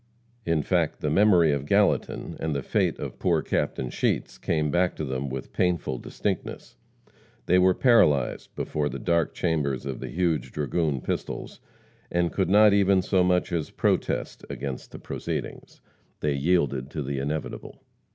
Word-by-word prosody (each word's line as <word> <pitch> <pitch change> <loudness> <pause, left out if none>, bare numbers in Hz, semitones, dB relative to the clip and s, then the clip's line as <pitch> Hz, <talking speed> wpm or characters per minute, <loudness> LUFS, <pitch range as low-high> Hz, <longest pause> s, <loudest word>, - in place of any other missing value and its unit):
In 80 -3 +2
fact, - - 0
the 75 - 0
memory 90 -3 +5
of 70 0 -2
Gallatin, 100 +2 +1
and 80 -2 -2
the 70 - -2
fate - - 0
of - - -7
poor - - +1
Captain 65 - -1
Sheets, - - -1
came 75 -3 0
back 90 +3 +1
to 80 - -4
them 65 +1 -3
with 65 0 -6
painful 85 -8 0
distinctness. - - -4 0.7
They 90 +6 +4
were 90 0 +4
paralyzed 75 - +3
before 75 -1 -2
the - - -5
dark 85 -2 0
chambers 75 -7 -1
of 65 -3 -4
the - - -6
huge 85 -6 -1
dragoon 75 -1 -1
pistols, - - -4 0.5
and 85 0 +1
could 95 -3 0
not 105 +1 +6
even 100 -2 +4
so 95 0 +2
much 90 0 +1
as 85 -3 -1
protest - - -1
against 70 -2 -5
the - - -8
proceedings. - - -6 0.4
They 75 -1 +1
yielded 70 -3 +1
to 75 -1 -4
the 70 0 -3
inevitable. 75 +3 -5
80 Hz, 160 wpm, -26 LUFS, 70-90 Hz, 0.7 s, not